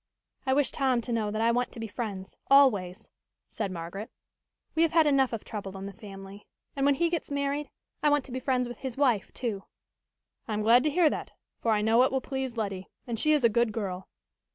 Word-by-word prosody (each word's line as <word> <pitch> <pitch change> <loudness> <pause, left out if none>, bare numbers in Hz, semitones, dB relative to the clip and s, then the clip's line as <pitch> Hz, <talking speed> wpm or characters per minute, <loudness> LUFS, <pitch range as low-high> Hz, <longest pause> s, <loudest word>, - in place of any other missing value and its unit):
"I 265 - +3
wish 290 -1 +2
Tom 260 -3 +1
to 240 - -5
know 220 -2 0
that 215 +2 -1
I 230 - +4
want 245 +1 0
to - - -9
be 225 - -3
friends, 200 -4 -5
always," 220 -8 +4 0.4
said 210 -3 -3
Margaret. 180 +5 -6 0.6
"We 325 - +1
have 330 -1 +3
had 325 -1 +5
enough 275 -3 +3
of 225 -3 -4
trouble 195 -3 -6
in 195 - -6
the 200 - -7
family. 195 0 -11 0.3
And 275 0 +2
when 285 - +4
he 340 +4 +2
gets 335 -1 -2
married, 285 +1 -2 0.3
I 300 - +4
want 290 -2 +2
to 270 - -7
be 255 - -3
friends 255 -1 0
with 240 - -8
his 260 -2 -5
wife, 245 -9 +2
too." 215 -6 -3 0.8
"I 220 - -3
am 210 - -1
glad 235 +4 +5
to - - +4
hear 320 +1 +4
that, - - -5 0.3
for 230 - -1
I 210 -1 +2
know 225 +2 +4
it 260 - +3
will 265 - +1
please 265 -2 -4
Letty 195 -4 -3 0.2
and 235 -3 -3
she 305 - +3
is 300 -3 +3
a - - +8
good 235 0 +2
girl. 190 -4 -4
235 Hz, 230 wpm, -28 LUFS, 210-275 Hz, 0.8 s, a